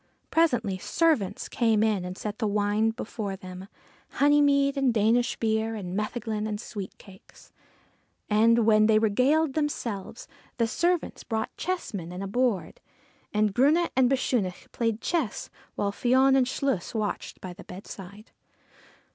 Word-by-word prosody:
Presently 245 - +2
servants 210 - +1
came 225 -3 +2
in 210 -4 +1
and 180 +1 -6
set 210 +3 -5
wine 210 +1 +1
before 215 -3 -5
them 185 0 -9 0.5
honey 290 +1 +4
mead 280 -1 +3
and 270 -2 +2
Danish 230 +2 +2
beer, 220 0 0
and 185 -4 -5
metheglin 215 0 -2
and 210 -1 -3
sweet 205 -4 -7
cakes. 190 -2 -17 0.8
And, 225 +2 +4
while 215 -1 +5
they 220 -1 +5
regaled 260 +8 +2
themselves, 235 -9 -3 0.3
the 230 - +2
servants 345 +9 -1
brought 220 -1 -3
chessmen 210 - -4
and 180 +2 -5
a - - -3
board, 200 -6 -1 0.5
and 210 -1 +1
Grunne 305 - +3
and 260 -2 +4
Bechunach 240 -8 -1
played 230 -2 -1
chess 320 - -2 0.2
while 200 -1 -1
Fion 260 +5 +3
and 260 -2 +3
Chluas 255 -6 -2
watched 215 -2 -3
by 185 -1 -7
the - - -12
bedside. 200 +2 -10
220 Hz, 140 wpm, -27 LUFS, 205-260 Hz, 0.8 s, while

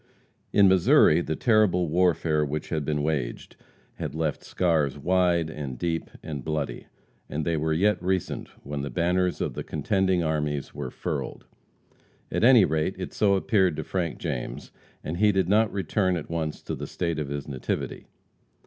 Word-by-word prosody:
In 100 -1 +6
Missouri, 90 -3 +5
the 80 -2 -2
terrible 105 -6 +3
warfare 80 -2 +2
which 75 +1 -3
had 80 -3 -1
been 75 0 -1
waged 70 -6 -3 0.4
had - - -5
left 80 -2 -2
scars 80 -6 +1
wide 90 +1 +2
and 70 -5 -6
deep 80 +4 -2
and 70 -4 -5
bloody, 75 -6 -3 0.4
and 75 +1 -3
they 85 - +1
were 80 +1 0
yet 100 +7 +2
recent 95 0 -1 0.2
when 70 0 -4
the 70 - -4
banners 90 +2 0
of - - -1
the - - -5
contending 95 +3 0
armies 75 -3 -2
were 70 -3 -5
furled. - - -5 0.9
At - - 0
any 120 -5 +7
rate, 80 +4 0
it 95 - -6
so 100 -2 +3
appeared 95 -4 +2
to 80 - -4
Frank 85 0 -2
James, - - -5 0.3
and 80 +3 -4
he 105 +2 +4
did 95 -3 +1
not 105 +3 +3
return 95 -2 0
at 80 - -7
once 80 -2 -3
to - - -4
the - - -5
State 85 -3 -2
of 75 -2 -3
his 70 -1 -4
nativity. 65 -3 -4
80 Hz, 170 wpm, -26 LUFS, 75-95 Hz, 0.9 s, any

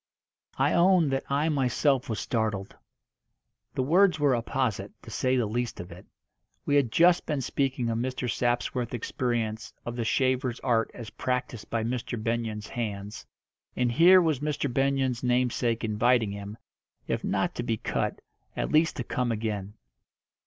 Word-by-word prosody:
I - - +2
own 175 -2 +4
that 135 0 -1
I 145 +3 +1
myself 135 -2 +1
was 110 - -2
startled. 105 -4 -2 1.0
The 130 - +1
words 175 +4 +4
were 145 -2 +3
apposite, 120 -1 -1
to - - -10
say 130 0 +1
the 120 - +2
least 120 +3 -3
of 90 0 -8
it. 90 +3 -12 0.6
We 145 - 0
had 135 -6 +3
just 175 +6 +4
been 150 -3 -1
speaking 130 -1 -1
of 115 0 -1
Mr. 130 0 -2
Sapsworth's 120 0 -1
experience 115 -2 -2
of 120 - -4
the 120 - -2
shaver's 130 +1 +1
art 115 -3 +1
as 115 -3 -8
practised 125 -3 -3
by 115 -1 -1
Mr. 120 +1 -3
Benyon's 110 -2 -2
hands, 105 -3 -5 0.5
and 125 -1 +1
here 175 +8 +7
was 155 -5 +1
Mr. 145 -3 -2
Benyon's 135 -2 +1
namesake 125 -1 +1
inviting 110 0 +2
him, 100 +1 -7 0.5
if - - -2
not - - 0
to - - -3
be - - -1
cut, - - -2 0.4
at - - -1
least 155 +1 +3
to 125 - -3
come 125 +1 -1
again. 105 -2 -3
125 Hz, 160 wpm, -27 LUFS, 115-135 Hz, 1.0 s, here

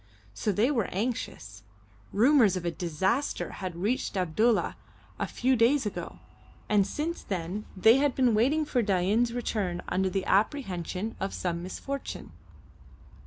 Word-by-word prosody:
So 210 - -1
they 220 +8 +2
were 230 -8 0
anxious. 180 - -4 0.5
Rumours 225 -3 +4
of 175 - -5
a 170 - 0
disaster 185 - -1
had 185 -2 -4
reached 205 +3 -1
Abdulla 200 +6 +2 0.4
a - - -1
few 260 +2 +1
days 245 +3 +3
ago, 210 - -5 0.5
and 205 -2 +3
since 315 +10 -3
then 185 +2 -4
they 220 +6 +6
had 280 -2 +1
been 250 -3 +3
waiting 275 +9 +2
for 255 -4 +1
Dain's 205 +4 +2
return 210 -7 -2
under 190 0 +1
the 190 +1 -2
apprehension 195 - 0
of 195 - -3
some 170 -2 -2
misfortune. 275 +10 -6
210 Hz, 140 wpm, -28 LUFS, 185-245 Hz, 0.5 s, they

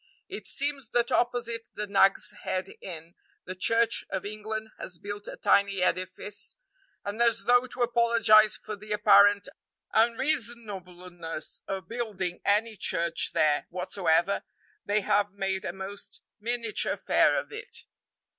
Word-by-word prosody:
It - - -6
seems 280 -4 -1
that 240 0 +2
opposite 235 -1 0
the 210 - -2
Nag's 195 -1 +3
Head 185 0 -3
Inn 165 -2 -7 0.3
the 185 - -5
Church 230 +5 +2
of 190 -1 -3
England 215 +1 -5
has 180 - -8
built 205 +3 -7
a - - -7
tiny 200 -2 +3
edifice, 185 +3 -2 0.5
and 205 +3 -3
as 230 -1 +3
though 245 +1 +4
to 245 - -2
apologize 230 -3 +5
for 215 - -7
the 210 +1 -5
apparent 205 -1 +6 0.5
unreasonableness 210 - -2
of 195 -1 -4
building 205 -7 -3
any 215 +2 +2
church 170 -3 0
there 150 -1 +2
whatsoever, 180 0 +1 0.4
they 210 +1 +1
have 205 +1 +1
made 195 -1 -2
a - - -2
most 195 +1 -7 0.2
miniature 230 0 -1
affair - - +3
of - - -8
it. 435 -1 -7
205 Hz, 135 wpm, -28 LUFS, 190-230 Hz, 0.5 s, apparent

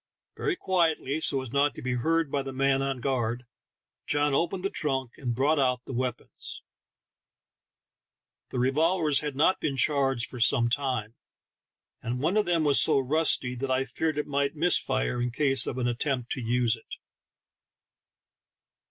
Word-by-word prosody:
Very 400 -4 -1
quietly, 160 - 0
so 135 -4 -1
as 125 - -9
not 140 -1 +2
to - - -8
be 130 0 -1
heard 160 +4 0
by 140 - 0
the 135 0 -6
man 135 0 +1
on 135 -2 -2
guard, 120 -2 -1 0.6
John 145 -1 +1
opened 175 +6 0
the 195 - 0
trunk 135 -5 -1
and 120 -3 -3
brought 145 +4 +2
out 125 -2 +1
the - - -7
weapons; 125 -1 -5 1.9
the - - -5
revolvers 150 +4 +2
had 150 -2 -4
not 160 +7 +3
been 140 -3 -2
charged 135 -4 +1
for 125 - -9
some 120 0 +3
time, 125 -4 -2 0.9
and 120 +2 -3
one 160 +8 0
of 215 -3 +2
them 170 -2 +2
was 145 -2 +5
so - - +4
rusty 135 -2 +1
that 130 +2 -4
I 130 +1 +1
feared 155 +4 -2
it 150 - -1
might 140 +1 -1
miss 170 +4 +3
fire 120 - -1
in 125 - 0
case 135 0 +2
of 130 - -3
an 125 -1 0
attempt 125 0 -2
to 130 - -1
use 120 0 +1
it. 115 - -11
135 Hz, 170 wpm, -27 LUFS, 125-150 Hz, 1.9 s, was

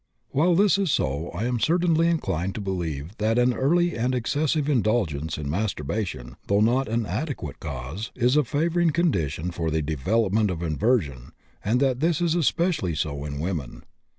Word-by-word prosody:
While 170 +5 +3
this 200 +1 +4
is 190 -6 +1
so, 70 - -1
I 110 - -3
am 125 -1 0
certainly 165 - +2
inclined 95 - -1
to - - -3
believe 85 -4 -4
that 110 +2 +1
an 125 0 +3
early 175 +8 +2
and 125 +3 0
excessive 145 +4 0
indulgence 105 - 0
in 75 -2 -4
masturbation, 80 - -3
though 100 +1 +3
not 120 +5 +2
an 115 0 0
adequate 110 - -4
cause, 75 - -6
is 125 +2 +2
a 150 - +4
favoring 165 +6 +1
condition 90 - 0
for 85 -1 -2
the 80 0 0
development 100 - +1
of 85 -2 -3
inversion, 80 - 0 0.3
and 115 +5 +1
that 130 -2 +2
this 165 +1 +1
is 170 -2 +1
especially 170 - +1
so 70 -1 -2
in 70 -1 -5
women. 80 -6 -4
110 Hz, 170 wpm, -25 LUFS, -, 0.3 s, this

